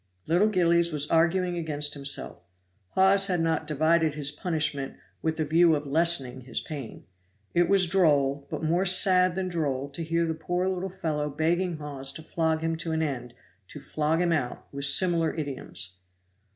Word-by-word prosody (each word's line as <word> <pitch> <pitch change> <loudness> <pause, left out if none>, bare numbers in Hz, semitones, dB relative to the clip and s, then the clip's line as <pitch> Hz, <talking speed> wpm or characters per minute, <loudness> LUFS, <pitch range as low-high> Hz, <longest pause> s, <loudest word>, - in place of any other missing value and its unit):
Little 175 +6 +3
Gillies 170 -4 +2
was 150 -1 0
arguing 175 +2 +2
against 150 -3 -2
himself. 140 -1 -1 0.6
Hawes 195 +1 +5
had 180 -2 0
not 160 -1 -1
divided 155 +1 +1
his 145 -1 -2
punishment 150 -3 -2 0.3
with 160 0 -2
the 155 - -1
view 165 +2 +4
of 145 0 -4
lessening 140 -4 +1
his 130 - -4
pain. 140 -7 -8 0.5
It 175 0 +2
was 195 -2 +5
droll, 145 -6 +1
but - - -5
more 170 +4 +1
sad 185 -1 +5
than 190 -1 -2
droll 140 -6 -2
to 155 +4 -6
hear 165 +1 0
the 160 - -1
poor 175 +3 -2
little 190 0 -2
fellow 155 -5 -3
begging 165 +4 -1
Hawes 140 -2 -4
to 160 - -9
flog 160 0 -1
him 165 0 -1
to 165 0 -3
an 160 0 0
end, 125 -5 -5 0.3
to - - -10
flog 155 +2 -1
him 175 -1 +1
out; 130 -6 -3
with 140 0 -1
similar 165 +2 +3
idioms. 130 - -5
160 Hz, 175 wpm, -26 LUFS, 145-175 Hz, 0.6 s, Hawes